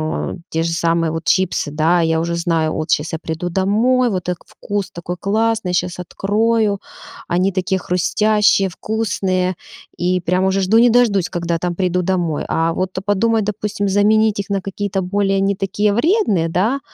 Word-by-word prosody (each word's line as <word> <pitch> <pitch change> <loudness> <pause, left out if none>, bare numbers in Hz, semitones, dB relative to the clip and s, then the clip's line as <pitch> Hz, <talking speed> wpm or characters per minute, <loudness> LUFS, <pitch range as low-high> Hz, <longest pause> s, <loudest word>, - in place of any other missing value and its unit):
ну, 155 +3 -3
те 160 0 -1
же 165 - -1
самые 165 -1 +1
вот 165 0 -4
чипсы, 185 -2 +1
да, 160 +4 +2
я 160 -1 +1
уже 170 +1 -2
знаю, 165 -2 0
от 155 - -3
щас 155 +3 0
я 160 - -2
приду 165 +2 -4
домой, 225 +7 +2
вот 185 -4 -2
так 180 -1 -3
вкус 205 -2 -4
такой 175 +1 -6
классный, 220 -1 0
щас 180 0 -1
открою. 210 +3 0 0.5
Они 185 +3 +1
такие 190 0 -1
хрустящие, 200 +3 +2
вкусные, 185 -2 -1 0.4
и 180 +1 0
прям 180 +2 0
уже 190 +1 +1
жду 210 +5 +3
не 240 +1 +6
дождусь 220 -6 +3
когда, 170 -1 -2
там, 175 +1 -2
приду 180 -1 0
домой. 175 -4 -1
А 165 +1 +1
вот 185 +2 -1 0.2
подумать, 215 +2 +1
допустим, 205 -1 -2
заменить 210 +1 +3
их 200 - -6
на 200 -1 0
какие-то 195 0 -3
более 195 +1 0
не 195 +1 +1
такие 205 +2 +1
вредные, 235 - +2
да, 210 +12 0
190 Hz, 175 wpm, -18 LUFS, 170-205 Hz, 0.5 s, не